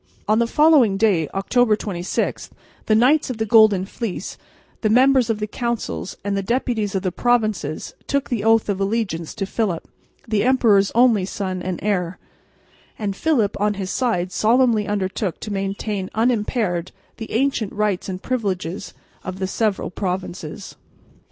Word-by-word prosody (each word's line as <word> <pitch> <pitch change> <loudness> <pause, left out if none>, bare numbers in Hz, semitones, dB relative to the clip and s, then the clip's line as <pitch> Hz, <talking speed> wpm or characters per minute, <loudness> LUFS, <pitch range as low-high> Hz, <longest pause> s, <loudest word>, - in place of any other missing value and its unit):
On 215 +2 +3
the 235 - +2
following 285 -8 +4
day, 195 -7 +2
October 220 +3 +2
26, 180 -4 -3 0.4
the 215 - +4
Knights 265 +7 +4
of 250 - -4
the 220 - -1
Golden 215 -3 +5
Fleece, 210 -1 -5 0.5
the 215 - +1
members 255 +1 +4
of 225 - +1
the 210 - -1
Councils 235 -2 -4
and 200 0 -1
the 195 - 0
deputies 220 -2 -1
of 190 - -1
the 185 - 0
provinces 215 -10 0
took 280 -1 0
the 230 -5 -2
oath 225 0 +4
of 200 -1 -1
allegiance 195 -6 -2
to 195 - -2
Philip, 195 -4 -2 0.4
the 215 -2 +1
emperor's 220 -6 +4
only 235 -5 +4
son 185 -1 -4
and 180 -1 -3
heir; 180 -4 -1 0.8
and 200 -3 -3
Philip 230 -7 +1
on 210 0 +1
his 190 -2 -4
side 205 -9 0
solemnly 225 0 +3
undertook 195 -2 -2
to 210 - -5
maintain 195 0 -3
unimpaired 215 -6 0 0.3
the 225 - -7
ancient 240 -4 0
rights 205 -3 -1
and 185 0 -6
privileges 190 -7 -3 0.3
of 185 0 -5
the 190 - -2
several 205 0 -1
provinces. 185 -2 -5
210 Hz, 155 wpm, -21 LUFS, 190-230 Hz, 0.8 s, Golden